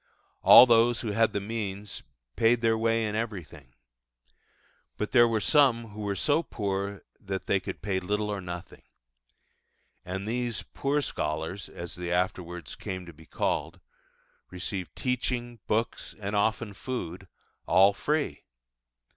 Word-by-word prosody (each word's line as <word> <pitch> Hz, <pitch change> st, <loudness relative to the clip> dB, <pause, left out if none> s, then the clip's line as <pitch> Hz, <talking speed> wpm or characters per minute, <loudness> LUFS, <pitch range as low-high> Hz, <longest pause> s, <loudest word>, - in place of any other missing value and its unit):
All -, -, +10 dB
those 120 Hz, 0 st, +4 dB
who 110 Hz, -, -2 dB
had 115 Hz, +2 st, +3 dB
the 100 Hz, -, -1 dB
means 105 Hz, -1 st, -5 dB, 0.3 s
paid 115 Hz, +1 st, +3 dB
their 115 Hz, -1 st, +3 dB
way 115 Hz, 0 st, +1 dB
in 105 Hz, -, -2 dB
everything. 90 Hz, -, -5 dB, 1.2 s
But 105 Hz, -, -3 dB
there 120 Hz, -2 st, +7 dB
were 115 Hz, -1 st, +1 dB
some 120 Hz, -4 st, +3 dB
who 105 Hz, +1 st, -8 dB
were 100 Hz, -1 st, -1 dB
so 145 Hz, +9 st, +2 dB
poor 100 Hz, -, -3 dB, 0.2 s
that 95 Hz, -1 st, -5 dB
they 100 Hz, -, +2 dB
could 95 Hz, -, -7 dB
pay 95 Hz, -2 st, 0 dB
little 105 Hz, +3 st, -1 dB
or 100 Hz, -2 st, -3 dB
nothing: 90 Hz, -1 st, -8 dB, 1.2 s
and 95 Hz, +3 st, -5 dB
these 120 Hz, -1 st, -2 dB
'poor 145 Hz, +1 st, -1 dB
scholars' 80 Hz, -, -3 dB
(as 85 Hz, 0 st, -8 dB
they 90 Hz, -1 st, -5 dB
afterwards 90 Hz, -2 st, -2 dB
came 95 Hz, -1 st, -6 dB
to 85 Hz, -, -11 dB
be 80 Hz, +1 st, -17 dB
called) -, -, -2 dB, 0.7 s
received 90 Hz, 0 st, -5 dB
teaching, 120 Hz, -2 st, -2 dB
books, 115 Hz, +2 st, -1 dB
and 100 Hz, 0 st, -3 dB
often 110 Hz, +1 st, 0 dB
food, 95 Hz, -6 st, -5 dB, 0.4 s
all 100 Hz, +2 st, +6 dB
free. 150 Hz, +8 st, -2 dB
105 Hz, 140 wpm, -28 LUFS, 95-115 Hz, 1.2 s, All